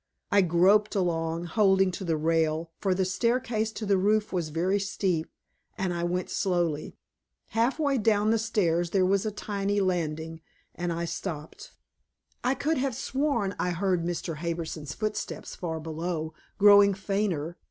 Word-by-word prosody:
I 200 - +6
groped 190 +5 +3
along, 165 -3 0
holding 190 +1 +3
to 185 - -6
the 165 -3 0
rail, 160 +1 0
for 190 -2 +1
the 190 0 +1
staircase 225 +3 0
to 220 - -5
the 200 -2 +3
roof 210 +2 +1
was 170 -4 -1
very 180 +6 +1
steep, 190 -4 -1 0.5
and 185 -2 -1
I 170 0 -2
went 180 +1 -2
slowly. 175 -5 -1 0.5
Half 230 +6 +1
way 285 -4 +1
down 215 0 +3
the 225 - +2
stairs 175 -6 +1
there 185 +1 +2
was 195 +3 +1
a - - -1
tiny 205 -1 -2
landing, 165 -3 -2 0.3
and 175 0 -3
I 170 0 -2
stopped. 160 -2 -6 0.7
I 255 +2 +2
could 295 +2 0
have 265 -2 -1
sworn 260 -7 -1
I 180 - 0
heard 180 0 0
Mr. 170 -2 -3
Harbison's 160 -3 -4
footsteps 215 -1 -4
far 165 -3 -4
below, 160 0 -4 0.2
growing 205 -1 +7
fainter. 190 -5 -2
185 Hz, 155 wpm, -27 LUFS, 165-210 Hz, 0.7 s, growing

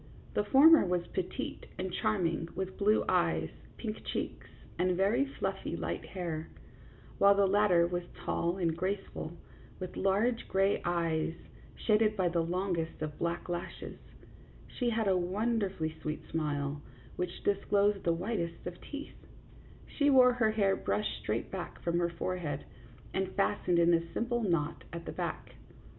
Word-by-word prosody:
The 210 - +2
former 290 +9 +7
was 180 -1 0
petite 180 - -4
and 185 0 -3
charm 215 -5 +1
ing, 165 0 -1
with 190 0 -3
blue 210 +2 +3
eyes, - - +2 0.3
pink 220 -2 -5
cheeks, - - -4 0.3
and 180 0 +2
very 200 +8 +3
fluffy 275 - -3
light - - -3
hair; 165 -4 -4 0.7
while 200 0 +7
the 200 0 +4
latter 195 -3 +4
was 175 0 -1
tall 170 +2 -1
and 170 -3 0
graceful, 190 -3 -3 0.5
with 185 -1 -6
large 210 +5 +1
gray 195 +1 +2
eyes, 165 -2 0 0.4
shaded 215 -1 +2
by 185 -2 +2
the 170 0 +1
longest 175 -1 -2
of 150 -1 -5
black 170 0 -2
lashes; 175 -1 -5 0.7
she 245 -2 -2
had 225 -2 0
a 190 - +4
wonderfully 190 -3 0
sweet 155 0 -4
smile, 145 -2 -1 0.3
which 180 -1 -4
disclosed 200 0 +2
the 170 - +3
whitest 170 -1 -2
of 175 0 -6
teeth; 290 0 -9 0.6
she 290 -1 +1
wore 255 -2 +7
her 235 -3 +2
hair 200 -3 +2
brushed 100 +2 -1
straight - - -2
back - - -5
from 170 0 +1
her 170 0 +1
forehead, 170 -4 -3 0.5
and 190 0 -1
fastened 195 -3 +1
in 170 0 +5
a 165 0 +1
simple 240 0 0
knot 170 -7 0
at 170 0 -6
the - - -4
back. - - -4
185 Hz, 150 wpm, -32 LUFS, 170-210 Hz, 0.7 s, former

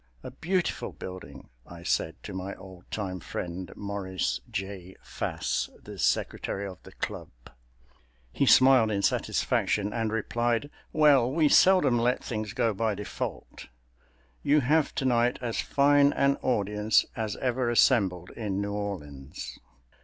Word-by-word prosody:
"A - - -7
beautiful 180 +1 -2
building," 95 0 -9
I 85 +4 -12
said - - 0
to - - -7
my 95 +1 -5
old 95 -2 -14
time 95 -3 -4
friend, 90 +2 -6
Maurice 100 -2 -3
J. 95 -1 -6 0.2
Pass, - - -1
the - - -11
Secretary 100 +1 -1
of 95 -2 -8
the - - -14
Club. - - -5 1.0
He 140 - 0
smiled 130 -4 +6
in 100 -2 -1
satisfaction 105 0 0
and 115 -2 -1
replied, 120 +4 -1 0.2
"Well, 140 -5 +4
we 155 0 +3
seldom 150 -12 +5
let 125 +2 +1
things 110 -3 -4
go 115 -3 +1
by 110 +1 0
default—you 60 - -4
have 150 +4 +2
tonight 125 -2 +2
as 120 -3 -2
fine 145 0 +4
an 140 0 +2
audience 105 -2 +1
as 110 -2 -3
ever 125 -1 -1
assembled 100 -8 +3
in 100 -4 -3
New 100 0 -2
Orleans." 75 -11 -6
105 Hz, 130 wpm, -28 LUFS, 95-125 Hz, 1.0 s, smiled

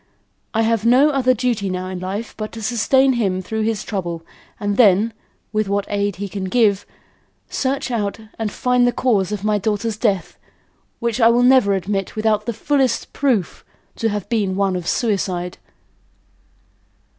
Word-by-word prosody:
I 225 - +3
have 225 -1 +1
no 255 +6 +5
other 255 -2 +2
duty 235 -6 -1
now 185 0 -3
in 185 -1 -5
life 195 +5 -5
but 215 -1 -5
to 225 - -7
sustain 260 +4 +3
him 195 -6 0
through 220 +4 -3
his 220 -2 -1
trouble 175 -5 -4 0.4
and 205 -1 -1
then, 215 0 +4 0.4
with 215 -2 0
what 200 0 0
aid 205 -1 -1
he 200 +3 -5
can 195 0 -5
give, 205 -1 +2 0.6
search 270 0 -1
out 205 -4 -1 0.2
and 220 -2 -2
find 250 +1 +2
the - - +3
cause 210 -7 +1
of 205 -2 -4
my 210 -1 +1
daughter's 215 +2 -1
death 205 -5 -1 0.6
which 235 0 -2
I 225 - +7
will 240 +1 +3
never 250 -6 +5
admit 195 0 -3
without 215 0 0
the - - +1
fullest 265 +1 0
proof, 250 -10 0 0.3
to 225 - 0
have 205 -2 -3
been 205 -5 0
one 195 -1 +1
of 175 -1 -4
suicide." 185 -5 -1
215 Hz, 170 wpm, -20 LUFS, 195-235 Hz, 0.6 s, I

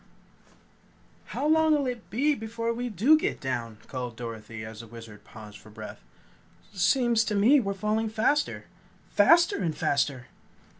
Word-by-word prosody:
"How - - -4
long'll 315 -2 +3
it 245 -3 -5
be 280 +9 +2
before 230 -1 -3
we 245 +1 -3
do 230 - +4
get - - -2
down?" 115 -4 -4
called 125 -3 -6
Dorothy, 115 -2 -7
as 110 0 -9
the 115 - -10
Wizard 110 -2 -12
paused 105 -1 -12
for 110 - -16
breath. 105 - -10 0.7
"Seems 230 +4 +2
to 210 - -1
me 235 +9 +5
we're 200 -5 -2
falling 215 +3 -1
faster. 225 +7 0 0.5
FASTER 345 +5 +5
AND 160 -3 -2
FASTER!" 140 -3 0
210 Hz, 145 wpm, -27 LUFS, -, 0.7 s, me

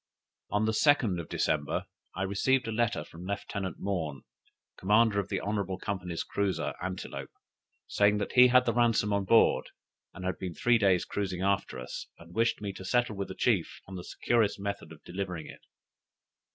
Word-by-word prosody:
On 105 +1 +1
the 110 - +2
2d 110 - +3
of 80 - -12
December 75 -2 0 0.3
I 95 - -1
received 120 +7 +1
a - - -2
letter 115 +1 0
from 85 +2 -12
Lieutenant 100 -1 -4
Maughn, 80 -9 -3 0.5
commander 105 +2 +3
of 100 -1 -3
the - - -1
Honorable 100 -2 -2
Company's 90 -3 -3
cruiser 100 -2 -1
Antelope, 95 0 -5 0.6
saying 105 0 +3
that 105 - -2
he 125 0 +8
had 125 0 +5
the 115 - +1
ransom 115 -3 +2
on 100 -1 0
board, 115 +4 +4 0.5
and 95 - -7
had 95 0 -2
been 90 -3 -5
three 120 +8 +3
days 95 -4 +3
cruising 95 -3 -3
after 100 -7 0
us, 65 0 -6
and 85 +1 -14
wished 115 0 +1
me 100 -2 -3
to 95 - -9
settle 120 +2 +1
with 100 0 -3
the 95 - -7
chief 100 -8 +1
on 95 - -11
the 90 -1 -6
securest 115 0 +1
method 100 -5 -4
of 80 - -13
delivering 90 -3 -5
it. - - -11
100 Hz, 180 wpm, -30 LUFS, 90-110 Hz, 0.6 s, he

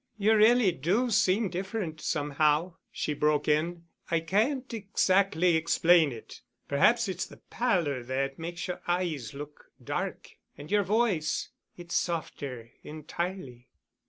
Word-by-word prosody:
"You 215 +2 +3
really 220 -1 +5
do 195 - 0
seem 200 +1 +2
different, 185 -4 -4
somehow," 150 +4 0
she 150 - -2
broke 150 0 +1
in. 165 +3 0 0.3
"I 165 -1 +1
can't 240 - 0
exactly 195 -4 +2
explain 165 -1 +4
it. 115 -2 -10 0.3
Perhaps 230 +12 +3
it's 185 -1 -3
the - - -14
pallor 170 - 0
that 135 +3 -3
makes 170 +1 -5
the 180 - -4
eyes 165 - -2
look 145 +1 -9 0.2
dark - - -4 0.2
and 145 +5 -10
your 205 0 +4
voice—it's 180 -4 -2
softer—entirely." 150 -1 -5
170 Hz, 120 wpm, -28 LUFS, 150-195 Hz, 0.3 s, really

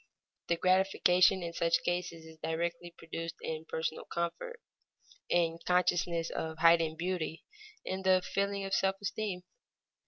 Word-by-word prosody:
The 170 - +1
gratification 185 0 +4
in 170 0 -4
such 165 0 +1
cases 175 -2 -2
is 160 0 -14
directly 170 +1 -2
produced 165 0 -6
in 160 0 -5
personal 160 0 -3
comfort, 320 - -4 0.7
in 170 -2 +3
the 165 - -11
consciousness 175 -2 +1
of 160 0 -4
heightened 165 -1 +4
beauty, 170 -2 -3 0.4
in 190 0 -3
the 185 -1 +4
feeling 200 0 -1
of 195 - -4
self 195 0 +2
esteem. 200 -3 -3
170 Hz, 135 wpm, -32 LUFS, 165-185 Hz, 0.7 s, gratification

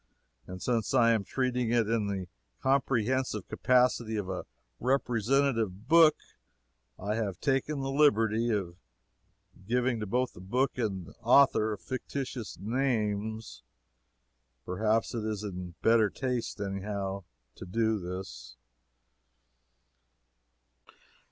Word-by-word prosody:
And 90 0 -7
since 115 0 0
I 115 -2 +5
am 110 -3 +2
treating 125 +1 -1
it 115 -2 +2
in 110 -2 0
the 95 -2 -3 0.3
comprehensive 130 -4 0
capacity 125 -3 +2
of 100 -3 -3
a 95 - -4 0.3
representative 120 -4 +1
book, 165 -1 +7 0.8
I 100 +3 -2
have 105 -5 -2
taken 140 +1 0
the 135 0 -2
liberty 115 -5 +3
of 95 -6 -2 0.9
giving 125 0 +1
to 105 - -4
both 125 +4 0
book 120 +10 -1
and 95 -7 -3
author 120 -4 +4
fictitious 130 -1 -5
names. 110 -2 -2 1.0
Perhaps 110 +5 0
it 115 -2 -3
is 105 -1 -3
in 90 -4 -6
better 110 -2 +5
taste, 125 -2 -3
any 100 -1 -3
how, 100 -2 -4 0.3
to - - -10
do 110 +2 +1
this. 85 -10 -7
110 Hz, 110 wpm, -30 LUFS, 100-125 Hz, 1.0 s, book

